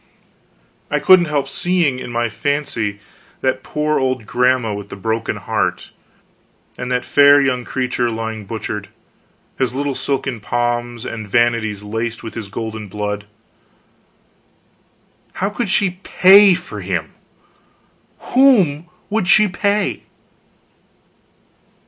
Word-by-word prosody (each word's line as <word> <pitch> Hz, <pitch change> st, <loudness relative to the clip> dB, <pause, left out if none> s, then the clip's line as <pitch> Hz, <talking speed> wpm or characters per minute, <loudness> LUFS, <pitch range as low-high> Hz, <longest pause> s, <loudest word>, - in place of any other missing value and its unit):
I 150 Hz, -, +1 dB
couldn't 185 Hz, +3 st, +6 dB
help 145 Hz, -3 st, -1 dB
seeing, 165 Hz, -3 st, 0 dB
in -, -, -7 dB
my 120 Hz, 0 st, 0 dB
fancy, 115 Hz, -4 st, -2 dB, 0.4 s
that 130 Hz, 0 st, 0 dB
poor 150 Hz, +1 st, -1 dB
old 130 Hz, -3 st, -1 dB
grandma 125 Hz, -1 st, +1 dB
with 100 Hz, 0 st, -7 dB
the -, -, -7 dB
broken 110 Hz, +3 st, -2 dB
heart, -, -, -2 dB, 0.8 s
and 125 Hz, 0 st, -5 dB
that 125 Hz, 0 st, 0 dB
fair 145 Hz, 0 st, +6 dB
young 130 Hz, -3 st, 0 dB
creature 125 Hz, -2 st, -1 dB
lying 110 Hz, -2 st, -5 dB
butchered, 105 Hz, -1 st, -5 dB, 0.7 s
his 130 Hz, -2 st, 0 dB
little 140 Hz, 0 st, -1 dB
silken 135 Hz, -2 st, -2 dB
pomps 120 Hz, +1 st, -2 dB
and 110 Hz, -2 st, -6 dB
vanities 115 Hz, -3 st, +1 dB
laced 115 Hz, +2 st, -4 dB
with 115 Hz, -, -7 dB
his 115 Hz, -3 st, -6 dB
golden 110 Hz, +1 st, -6 dB
blood. 105 Hz, +1 st, -4 dB, 2.1 s
How 195 Hz, +2 st, -2 dB
could 220 Hz, 0 st, -3 dB
she 185 Hz, -2 st, 0 dB
pay 195 Hz, 0 st, +6 dB
for 170 Hz, -, -7 dB
him! 90 Hz, -4 st, -3 dB, 1.2 s
Whom 195 Hz, -, +4 dB, 0.2 s
could 205 Hz, -4 st, 0 dB
she 215 Hz, +2 st, +5 dB
pay? 205 Hz, +2 st, -1 dB
125 Hz, 120 wpm, -18 LUFS, 110-150 Hz, 2.1 s, couldn't